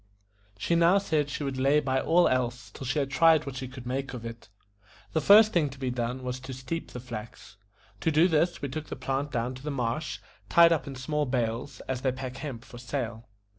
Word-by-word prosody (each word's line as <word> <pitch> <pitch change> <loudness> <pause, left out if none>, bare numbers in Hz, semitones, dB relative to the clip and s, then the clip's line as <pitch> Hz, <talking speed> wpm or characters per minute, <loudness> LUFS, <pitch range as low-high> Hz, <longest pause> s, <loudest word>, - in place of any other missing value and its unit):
She 140 - -1
now 170 +3 +5
said 155 -7 0
she 145 - -4
would 135 -2 -3
lay 140 +3 +4
by 130 -2 0
all 175 +2 +4
else 120 -4 -1
till 130 - -7
she 135 - -1
had 135 -2 0
tried 160 +2 +5
what 140 -2 -6
she 130 - -4
could 130 -1 -10
make 135 +1 -3
of 115 -2 -7
it. 115 0 -8 0.6
The 160 - +2
first 210 +6 +7
thing 155 -5 +2
to 135 - -11
be 130 -2 -2
done 125 +1 -3
was 125 0 -3
to 130 0 -8
steep 130 +6 -5
the 125 - -7
flax. 115 -4 -9 0.4
To - - +1
do 160 +3 +5
this 170 -1 +1
we 140 - -1
took 155 +3 -5
the - - -5
plant 135 +2 -2
down 120 +2 -1
to 130 - -10
the 150 - -4
marsh, 135 +2 -2 0.3
tied 170 0 +7
up 160 -4 +1
in 135 - -6
small 150 +3 -1
bales, 125 +2 -2
as 130 -1 -4
they 130 - +1
pack 130 0 -6
hemp 135 -5 -6
for 120 - -11
sale. 120 -3 -4
135 Hz, 230 wpm, -28 LUFS, 125-150 Hz, 0.6 s, first